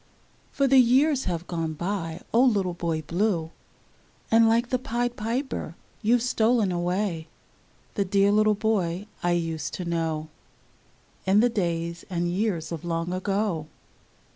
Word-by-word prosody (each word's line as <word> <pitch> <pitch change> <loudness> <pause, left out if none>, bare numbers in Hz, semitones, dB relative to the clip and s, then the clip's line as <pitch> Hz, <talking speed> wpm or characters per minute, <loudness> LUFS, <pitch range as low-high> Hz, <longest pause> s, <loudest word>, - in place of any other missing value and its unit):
For 275 - +1
the 270 0 +6
years 265 +3 +4
have 175 -1 -2
gone 165 -3 -3
by, 170 0 -4
O 235 - +5
little 200 -8 +2
Boy 165 -2 -2
Blue, 170 -1 0 0.8
And 225 0 +6
like 235 +2 +2
the 255 - 0
Pied 240 0 -2
Piper 245 +6 -3 0.3
you've 235 +2 +3
stolen 225 -4 +2
away 175 -1 -1 0.3
— - - -35
The 200 - 0
dear 195 +1 +3
little 215 0 +4
boy 200 -4 0 0.2
I 175 0 +1
used 165 -4 -2
to 180 - -5
know, 160 -2 -2 1.0
In 195 +2 +5
the 245 +2 +4
days 170 -5 -2
and 175 -2 -1
years 185 -4 -1
of 165 -3 -5
long 170 +1 -2
ago. 190 -4 -1
190 Hz, 145 wpm, -26 LUFS, 170-225 Hz, 1.0 s, the